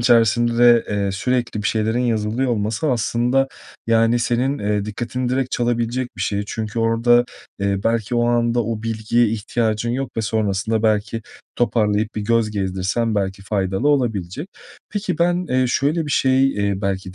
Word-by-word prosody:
içerisinde, 120 0 +4
eee, 100 -1 -1
sürekli 120 0 -1
bir - - 0
şeylerin 110 +2 0
yazılıyor 115 +1 0
olması 110 +6 -1
aslında, 125 +3 +1 0.4
yani, 115 +1 +3
senin, 125 +4 0
eee, 105 -1 -1
dikkatini 120 +3 -3
direkt 130 0 -1
çalabilecek 120 +1 -1
bir - - -3
şey 100 0 -1
çünkü 110 +1 -4
orada, 115 +2 +3 0.4
eee, 100 0 0
belki 115 0 0
o 120 0 +2
anda 120 -1 +1
o 110 -1 -3
bilgiye 115 +1 +1
ihtiyacın 110 +1 -1
yok 130 +2 -2
ve - - +1
sonrasında 110 0 0
belki 110 +1 0 0.3
toparlayıp 110 -3 +1
bir 105 - -2
göz 115 0 +1
gezdirsen 100 +3 -1
belki 95 -1 -2
faydalı 95 +5 -1
olabilecek. 125 - -1 0.4
Peki, 205 -4 -3
ben, 175 +1 +1
eee, 130 0 +2
şöyle 150 +5 0
bir - - -4
şey, 135 0 +3
eee, 100 -1 0
belki 95 -1 -3
115 Hz, 155 wpm, -20 LUFS, 105-120 Hz, 0.4 s, içerisinde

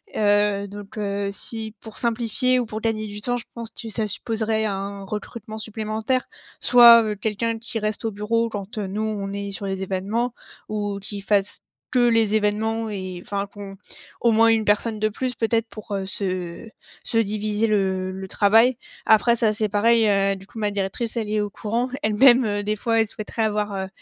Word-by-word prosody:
heu, 205 -1 +2
donc, 205 +1 -10
heu, 200 -1 -2
si 220 +1 -3
pour 220 -1 -9
simplifier 240 +2 +2
ou 245 - -1
pour 215 +1 -5
gagner 215 -1 -1
du 205 0 -8
temps, 245 +2 0
je 235 - -7
pense 230 -1 -4
que 230 - -6
ça 220 0 -1
supposerait 220 +1 -1
un 200 -1 -4
recrutement 215 +2 -7
supplémentaire. 220 +3 -2 0.4
Soit, 235 -1 +9
heu, 215 -1 -2
quelqu'un 225 +2 -1
qui 225 0 -4
reste 215 +2 -2
au 225 - 0
bureau 225 +3 0
quand, 205 +2 -7
heu, 205 -2 -2
nous 205 +3 -3
on 205 -2 -3
est 200 0 -4
sur 200 0 -4
les 195 -1 -3
événements 200 +6 -2 0.4
ou 205 -1 -2
qui 200 0 -6
fasse 200 0 0 0.3
que 255 - +2
les 225 -2 +3
événements 220 +1 0
et 185 -3 -5
enfin, 200 0 -3
qu'on 200 -1 -10 0.4
au 235 - +3
moins 225 +1 +5
1 225 -1 +3
personne 215 +2 +1
de 215 +1 +1
plus 250 +3 -3
peut-être 230 0 0
pour, 215 -1 -8
heu, 190 -1 -3
se 185 0 -4 0.4
se 225 - +1
diviser 215 +1 0
le 190 -3 0
le 190 0 -7
travail. 225 +6 +4 0.3
Après 235 +2 +5
ça 220 -2 +2
c'est 215 -1 0
pareil, 225 +2 +4
heu, 195 -1 +2
du 195 +1 -13
coup 230 - -14
ma 210 -1 0
directrice 200 +4 -3
elle 215 -2 -2
est 215 - +1
au 205 -1 -2
courant 230 +5 -2
elle-même, 240 +3 +5
heu, 205 0 -1
des 210 +1 -1
fois, 225 +2 0
elle 225 - +4
souhaiterait 215 +2 -4
avoir, 210 -1 -1
heu, 190 0 -3
215 Hz, 195 wpm, -23 LUFS, 200-225 Hz, 0.4 s, Soit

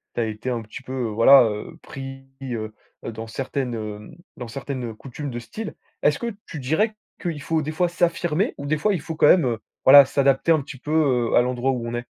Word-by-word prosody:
tu 120 - 0
as - - +1
été 110 +3 -4
un 120 -2 -2
petit 110 +6 -10
peu, 130 - -7
heu, 125 -4 -2
voilà, 125 +5 +7
heu, 105 -1 -5
pris, 135 0 -8 0.2
heu, 115 -5 -4 0.3
dans 115 0 -6
certaines, 130 +1 -3
hem, 105 +4 -7 0.2
dans 120 - -6
certaines, 135 +1 -5
heu, 115 - -5
coutumes 135 +5 -7
de 120 - -4
style- 205 - -7 0.3
est-ce 150 - +3
que 235 -2 -3
tu 155 - -7
dirais 160 - +1 0.3
qu'il 165 -5 -3
faut 160 +2 0
des 155 +1 -3
fois 175 +2 +1
s'affirmer 175 +1 0
ou 140 - -7
des 155 +2 0
fois, 210 +7 +1
il 175 - -2
faut 160 +2 -6
quand 155 - +4
même, 170 -4 +6
heu, 115 -3 -1 0.3
voilà, 140 +1 +10
s'adapter 135 +3 +2
un 155 -3 +4
petit 135 0 -9
peu, 145 +4 -7 0.4
heu, - - +4
à - - +6
l'endroit 125 +1 0
où 120 -2 -3
on 115 - -5
est? 120 - -4
135 Hz, 235 wpm, -23 LUFS, 120-155 Hz, 0.4 s, voilà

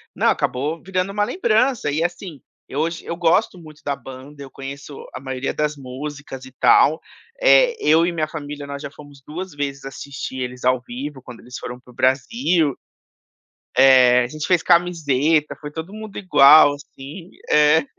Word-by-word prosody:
Não, - - +1
acabou 150 +6 -1
virando 185 +1 -2
uma 205 +1 0
lembrança, 235 - +1
e, 155 +3 0
assim, 175 -4 -5 0.3
eu 140 - -5
hoje 165 +1 -3
eu 170 - -4
gosto 175 +4 +1
muito 155 -3 -14
da 140 - -2
banda, 135 +2 -12
eu 135 - -11
conheço 140 +1 -9 0.2
a - - -6
maioria 130 0 -4
das 150 0 -1
músicas 135 0 -8
e 130 - -13
tal, 160 +2 +5 0.4
eh, - - +5
eu 160 +2 +4
e 175 - 0
minha 155 -2 -2
família 145 -2 -7
nós 140 0 -7
já - - -7
fomos 145 -1 -15
2 180 +2 -7
vezes 140 -2 -5
assistir 135 -1 -7
eles 125 0 -6
ao 130 0 +2
vivo 135 +3 -7
quando 125 -3 -11
eles 125 +2 -10
foram 125 0 -7
pro 125 0 -19
Brasil. 150 - +1 1.0
É. 125 -2 +6
A 120 - -3
gente 155 +2 -6
fez 180 -3 +3
camiseta, 160 -4 +2
foi 150 -1 -7
todo 160 +6 -7
mundo 215 -1 -9
igual, 145 -5 +7
assim. 145 +4 -11 0.2
É. 150 +1 +4
150 Hz, 175 wpm, -21 LUFS, 135-170 Hz, 1.0 s, igual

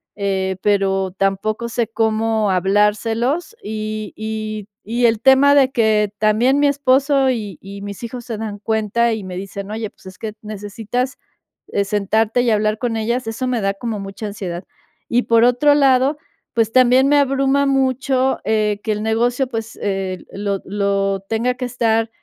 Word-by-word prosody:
eh, 190 -2 -1
pero, 195 -2 +1
tampoco 195 +4 -1
sé 235 -1 -1
cómo 220 -2 0
hablárselos, 220 - +1
Y 215 0 -5
y 215 -1 -5 0.2
y 240 +1 +1
el 225 -2 +1
tema 270 +3 +6
de 270 -2 +5
que 215 -3 +2
también 230 +6 +3
mi 290 - +4
esposo, 275 0 +3
y 210 -8 -3
y 200 +1 -9
mis 200 +1 -7
hijos 240 +1 -6
se 225 -3 -5
dan 210 -2 -5
cuenta, 220 +2 +1
y 215 -3 -4
me 180 -1 -6
dicen: 195 +1 -6
"Oye, 220 -1 -4
pues, - - -25
es 185 0 -11
que 215 -2 -5
necesitas 215 +5 -4 0.7
sentarte, 210 +3 +1
eh, 235 -3 +2
hablar 215 0 +1
con 235 -1 -2
ellas", 235 +2 -1
eso 225 +3 -3
me 245 -2 0
da 195 0 0
como 215 0 -4
mucha 195 +2 -6
ansiedad. 185 -3 -5 0.5
Y 245 +1 +2
por 230 0 +4
otro 250 +4 +4
lado, 270 +1 +3 0.4
pues, 225 -1 +1
también 255 +1 +5
me 290 - +5
abruma 275 0 +2
mucho, 265 -1 +1
eh, 215 -1 +1
que 215 - +1
el 210 +1 -4
negocio, 240 +4 +1
pues, 225 -2 -6
eh, 195 -2 -2
lo 200 -1 -3
lo 195 -1 0
tenga 240 +3 0
que 250 0 -4
estar, 225 -2 0
220 Hz, 165 wpm, -19 LUFS, 205-250 Hz, 0.7 s, tema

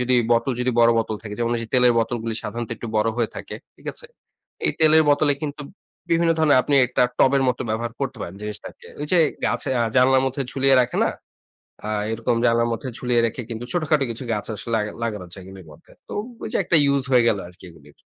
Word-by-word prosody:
যদি 125 0 +1 0.2
বোতল 115 +3 +1
যদি 125 +1 +1
বড় 115 0 +6
বোতল 110 -1 -2
থাকে, 105 -2 -7
যেমন 120 0 0
ওই 120 - -2
যে - - -6
তেলের 125 -1 +5
বোতলগুলি 115 0 -2
সাধারণত 120 -1 -5
একটু 120 - -7
বড় 105 +1 +2
হয়ে 115 -2 0
থাকে - - -7 0.2
ঠিক - - -19
আছে? - - -10 0.6
এই - - +1
তেলের 160 0 +7
বোতলে 145 0 +4
কিন্তু 145 -1 -4 0.5
বিভিন্ন 165 0 +3
ধরনের 150 -4 +4
আপনি 145 - 0
একটা 125 - +1 0.2
টবের 135 +1 +4
মতো 125 - -1
ব্যবহার 115 +2 -2
করতে - - -3
পারেন 85 - -7
জিনিসটাকে। 105 0 -8
ওই 150 - -3
যে 180 - +5 0.3
গাছে 135 - -1 0.3
জানালার 130 +1 +5
মধ্যে 135 +1 -2
ঝুলিয়ে 135 0 +3
রাখে 125 - -1
না, - - +1 0.8
আ - - -3 0.2
এরকম 115 +1 -1
জানালার 115 0 +2
মধ্যে 130 +3 -5
ঝুলিয়ে 125 -1 +1
রেখে 115 +3 -6
কিন্তু 115 +1 -5
ছোটখাটো 155 -5 +1
কিছু 115 +3 -6
গাছ 105 - -3
আসলে 110 +3 -7
লাগা 105 -1 -2
লাগানো 105 -5 -3
যায় 95 - -10
এগুলির 95 -2 -12
মধ্যে। 75 - -18 0.2
তো - - -8 0.3
ওই - - -4
যে - - +2
একটা 170 - +1
ইউস 140 -1 +1
হয়ে 125 -2 +5
গেল 105 - +2
আরকি 90 +1 -15
এগুলির। 75 -3 -18
120 Hz, 215 wpm, -22 LUFS, 110-135 Hz, 0.8 s, তেলের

